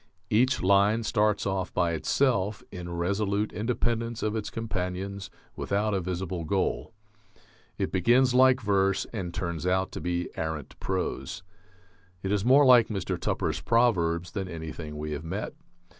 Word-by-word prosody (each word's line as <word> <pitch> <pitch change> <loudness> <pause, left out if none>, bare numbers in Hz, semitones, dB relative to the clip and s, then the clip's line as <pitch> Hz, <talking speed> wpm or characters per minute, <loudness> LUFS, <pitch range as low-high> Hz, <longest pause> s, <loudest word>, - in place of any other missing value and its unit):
Each 125 +3 +3
line 100 +4 +4
starts 105 -2 +1
off 95 -2 -1
by 85 -1 +2
itself, 105 - +1
in 90 -2 -7
resolute 100 +4 -1
independence 115 +1 -1
of 110 0 0
its 105 -2 -3
companions, 100 -2 -4 0.3
without 105 +1 -1
a 95 - 0
visible 90 -1 -3
goal... 95 +7 -1 0.9
it - - -2
begins 125 +7 +3
like 130 0 +5
verse 100 -2 +1
and 95 -6 -4
turns 85 -1 -3
out 95 0 +1
to - - -6
be 90 +1 -1
arrant 80 -3 -4
prose. 95 -1 -3 0.8
It 95 - -2
is 105 -2 +1
more 135 +5 +6
like 125 -3 +7
Mr. 100 -4 -2
Tupper's - - -1
proverbs 90 -8 +2
than 95 -3 -3
anything 80 -2 -7
we 75 0 -4
have 75 +1 -4
met.... 80 - -4
100 Hz, 145 wpm, -27 LUFS, 90-110 Hz, 0.9 s, like